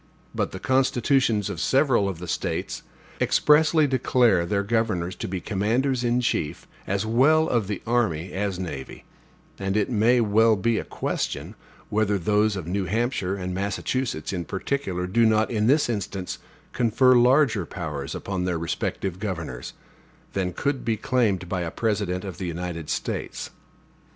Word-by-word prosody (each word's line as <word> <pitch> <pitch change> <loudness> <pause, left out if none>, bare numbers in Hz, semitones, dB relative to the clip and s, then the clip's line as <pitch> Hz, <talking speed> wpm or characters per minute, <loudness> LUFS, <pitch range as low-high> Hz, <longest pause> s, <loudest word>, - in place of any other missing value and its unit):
But - - -1
the - - -6
constitutions 130 -3 +2
of - - -5
several 130 -7 +3
of 95 - -5
the 90 +1 -8
States - - -3 0.4
expressly 155 +1 +4
declare 120 -8 +2
their 100 +2 0
governors 100 -5 0
to - - -4
be 95 0 -3
commanders 120 +7 0
in 120 +1 +2
chief, 80 -9 -2 0.2
as 100 +2 0
well 145 +8 +4
of 115 -8 0
the 105 -2 -4
army 95 -8 0
as 100 -1 -2
navy; 75 -8 -6 0.6
and 95 +1 -1
it 105 +3 0
may 120 +2 +4
well 110 0 +4
be 110 +3 +1
a - - -4
question, - - -3 0.4
whether 105 -1 +1
those 105 +3 +2
of 95 -5 -5
New 95 +3 -1
Hampshire 100 -1 -1
and 90 -2 -4
Massachusetts, 100 0 -2
in 90 -2 -2
particular, 95 -1 -2
do 110 +6 +2
not, 110 0 +3
in 110 -2 +1
this 145 +4 +4
instance, 100 -5 -4 0.3
confer 125 +2 +4
larger 125 - +4
powers 75 -5 -5
upon 95 -2 -3
their 90 -2 0
respective 85 +2 -3
governors, 80 - -5 0.6
than 95 -2 -1
could 135 +8 -2
be 115 -2 0
claimed 105 -6 0
by 90 0 -2
a 85 - -2
President 100 -2 -1
of 95 -3 -7
the 95 - -3
United 85 -2 -5
States. - - -3
105 Hz, 155 wpm, -25 LUFS, 90-120 Hz, 0.6 s, expressly